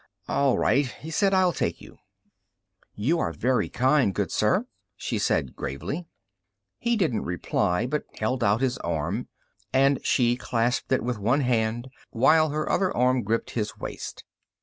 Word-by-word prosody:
"All 140 -3 +2
right," 140 0 +2
he 155 +5 -9
said; 195 +4 +2
"I'll 185 -2 +3
take - - -2
you." - - -15 1.0
"You 145 +12 +1
are 85 - 0
very 125 +8 0
kind, 130 - +2
good - - -1
sir," - - +2 0.3
she - - -3
said 65 - 0
gravely. 145 - -5 0.7
He 235 0 +1
didn't 145 - +1
reply, 90 +2 0
but 150 +4 -2
held 120 +3 -1
out 105 +3 +2
his 130 -1 0
arm, 85 +8 -2 0.4
and 135 +1 +3
she 120 -1 +2
clasped 120 0 -1
it 130 - +2
with 120 -2 -2
one 120 +8 +2
hand 120 -1 0 0.2
while 155 +6 +4
her 150 +1 -2
other 190 -1 +1
arm 125 +1 +3
gripped 115 +2 -1
his 105 -3 -3
waist. - - -7
125 Hz, 155 wpm, -26 LUFS, 110-145 Hz, 1.0 s, while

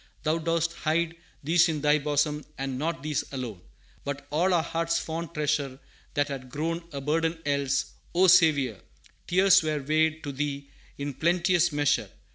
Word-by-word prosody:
"Thou 160 +1 +1
dost 165 +1 0
hide 165 +1 0 0.3
These 165 +3 +4
in 155 -2 -2
Thy 150 +1 +4
bosom, 150 +1 0
and 135 -1 -3
not 165 +1 -2
these 150 -2 -1
alone, 120 -9 -5 0.4
But 140 0 -5
all 175 +5 +2
our 170 -3 +3
heart's 165 0 -1
fond 165 0 -4
treasure 145 -3 -1 0.4
that 145 0 +2
had 135 -2 -6
grown 165 +5 -2
A 140 - -4
burden 160 +4 0
else: 140 -1 0 0.2
O 185 +2 +5
Saviour, 155 - +5 0.5
tears 190 +1 +5
were 155 -2 -1
weighed 155 +2 +1
To 145 - -4
Thee 140 0 -4 0.3
in 140 0 -4
plenteous 175 +2 +2
measure! 145 -1 +1
155 Hz, 160 wpm, -27 LUFS, 140-165 Hz, 0.5 s, O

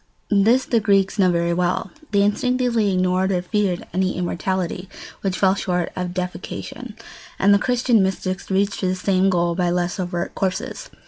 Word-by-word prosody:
This 225 +6 +4
the 235 - +2
Greeks 200 -1 +2
knew 185 -2 +5
very 170 0 +1
well. 175 +1 -1 0.2
They 200 -1 +3
instinctively 235 0 +1
ignored 185 +1 +1
or 180 -2 0
feared 190 -2 -1
any 185 +1 0
immortality 180 +1 -2 0.3
which 190 -2 -1
fell 190 -1 +4
short 180 -3 -1
of 180 -1 -4
deification; 185 +5 -6 0.4
and 200 +1 +4
the 200 - +5
Christian 245 -1 +2
mystics 190 0 -2
reached 200 +1 0
the 185 -1 0
same 190 +1 +2
goal 175 -2 +1
by 175 0 0
less 175 +1 -1
overt 175 -1 -3
courses. 190 -1 -3
190 Hz, 160 wpm, -22 LUFS, 180-200 Hz, 0.4 s, knew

